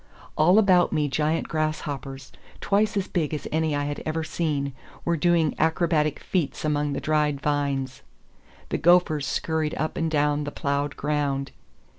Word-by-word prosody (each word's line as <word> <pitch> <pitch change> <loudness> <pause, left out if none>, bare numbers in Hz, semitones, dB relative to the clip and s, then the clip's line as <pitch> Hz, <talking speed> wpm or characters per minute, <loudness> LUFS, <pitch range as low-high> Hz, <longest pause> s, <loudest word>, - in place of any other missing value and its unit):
All 175 +6 +5
about 185 -4 +4
me 150 -1 +1
giant 155 +4 0
grasshoppers, 145 -4 -3 0.3
twice 205 +1 +1
as 195 - -1
big 155 -4 -1
as 150 - -6
any 160 -1 +1
I 145 - -1
had 145 0 -4
ever 160 +1 -2
seen, 145 -4 -2 0.3
were 170 - +2
doing 165 -1 +2
acrobatic 160 -2 +1
feats 170 -4 -2
among 150 -1 0
the - - -2
dried 150 -2 +1
vines. 140 -2 -1 0.7
The - - -1
gophers 170 -4 +3
scurried 160 -2 -1
up 155 - -3
and 165 -1 0
down 150 -1 +1
the 145 - -4
ploughed 140 0 -2
ground. 140 -2 -1
150 Hz, 155 wpm, -25 LUFS, 145-160 Hz, 0.7 s, All